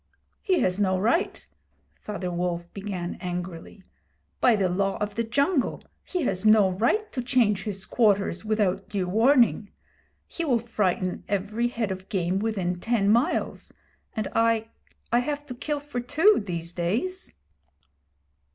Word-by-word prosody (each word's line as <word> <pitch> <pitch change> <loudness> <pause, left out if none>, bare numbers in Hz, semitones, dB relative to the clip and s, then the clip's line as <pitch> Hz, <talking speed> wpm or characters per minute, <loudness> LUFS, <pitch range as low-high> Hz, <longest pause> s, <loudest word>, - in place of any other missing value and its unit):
'He 375 -4 +2
has 180 +2 +1
no 190 -2 +2
right!' 235 - 0 0.5
Father 195 -4 -5
Wolf 175 0 -3
began 190 -3 -5
angrily 180 +1 -6 0.6
'By 240 - +5
the 195 -3 +1
Law 195 +2 0
of 210 0 -3
the 230 - -1
Jungle 280 +5 0 0.2
he 360 -3 -2
has 185 -7 -1
no 215 -3 +5
right 240 - 0
to 250 - -3
change 230 -6 +2
his 195 -3 -4
quarters 205 -5 +2
without 210 -3 0
due 195 -3 -2
warning. 225 +1 +3 0.6
He 340 - -5
will 265 -7 +2
frighten 195 -5 -1
every 210 +4 -1
head 230 -4 -2
of 190 0 -7
game 185 -1 0
within 190 -5 -1
ten 220 -1 +1
miles, 245 +10 0 0.4
and 215 -2 -1
I 225 -1 +2 0.4
I 240 - +4
have 290 +3 -3
to 265 - -7
kill 295 +4 -3
for 285 -3 -5
two, 305 - +4
these 170 -3 -5
days.' 235 - -2
210 Hz, 145 wpm, -26 LUFS, 185-245 Hz, 0.6 s, By